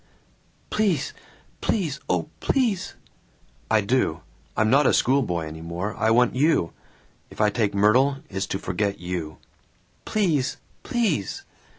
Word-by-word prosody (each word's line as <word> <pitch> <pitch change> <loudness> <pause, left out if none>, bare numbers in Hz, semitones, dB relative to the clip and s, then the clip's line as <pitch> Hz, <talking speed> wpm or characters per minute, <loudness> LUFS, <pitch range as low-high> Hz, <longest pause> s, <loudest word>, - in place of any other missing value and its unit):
"Please, 195 -10 +1 0.5
please, 160 - 0
oh, - - +1
please!" 235 -9 0 0.7
"I 110 -1 +4
do. 100 -6 0 0.4
I'm 110 - +3
not 135 +5 +5
a - - +4
schoolboy 120 -11 +1
any 80 +1 -8
more. 85 +5 -4
I 110 - +1
want 120 +2 +4
you. 145 - +2 0.6
If - - -14
I 105 -1 +4
take 105 -2 0
Myrtle, 125 +8 +4
it's 95 -1 -3
to - - -2
forget 100 +1 -2
you." 90 -4 -5 0.7
"Please, 160 -11 0 0.2
please!" 200 - -1
115 Hz, 125 wpm, -24 LUFS, 95-145 Hz, 0.7 s, not